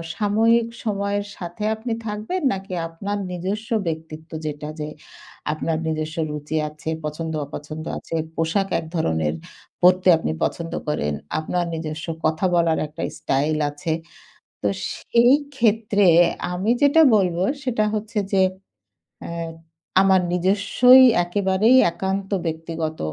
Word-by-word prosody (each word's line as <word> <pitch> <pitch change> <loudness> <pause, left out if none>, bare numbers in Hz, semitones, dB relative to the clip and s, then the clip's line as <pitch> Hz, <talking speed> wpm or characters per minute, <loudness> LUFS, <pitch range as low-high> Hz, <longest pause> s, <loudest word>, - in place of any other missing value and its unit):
সাময়িক 225 +2 +3 0.2
সময়ের 200 -1 -1
সাথে 175 +3 -6
আপনি 225 +1 -4
থাকবেন? 215 - -3
নাকি 190 -1 -6
আপনার 200 +5 -4
নিজস্ব 195 +5 -4 0.2
ব্যক্তিত্ব 160 0 -6
যেটা 150 0 -4
যে 150 - -3 0.7
আপনার 160 +1 -2
নিজস্ব 155 0 -3
রুচি 150 +1 -5
আছে, 150 +1 -7 0.2
পছন্দ-অপছন্দ 155 0 -5
আছে, - - -6 0.2
পোশাক 170 +5 0
এক 165 - -7
ধরনের 80 - 0 0.5
পড়তে 185 +1 +5
আপনি 120 - -2
পছন্দ 165 -1 -2
করেন। 75 - -1 0.3
আপনার 175 +3 -1
নিজস্ব 160 0 -4 0.2
কথা 155 +4 +1
বলার 165 -2 +2
একটা 150 - -7 0.2
স্টাইল 150 +3 0
আছে। 145 +3 -4 0.7
তো 100 - +2 0.3
সেই 240 +2 +3 0.2
ক্ষেত্রে 210 -3 +2 0.5
আমি 185 +5 -1
যেটা 285 +3 +6
বলবো 180 -3 +1 0.2
সেটা 230 -4 +1
হচ্ছে 215 0 -3
যে 195 -1 +4 0.9
আ - - -7 0.7
আমার 190 -1 +4
নিজস্বই 200 +8 +5 0.2
একেবারেই 200 +6 +3
একান্ত 190 +2 -3 0.2
ব্যক্তিগত 160 0 -4
180 Hz, 120 wpm, -22 LUFS, 155-205 Hz, 0.9 s, যেটা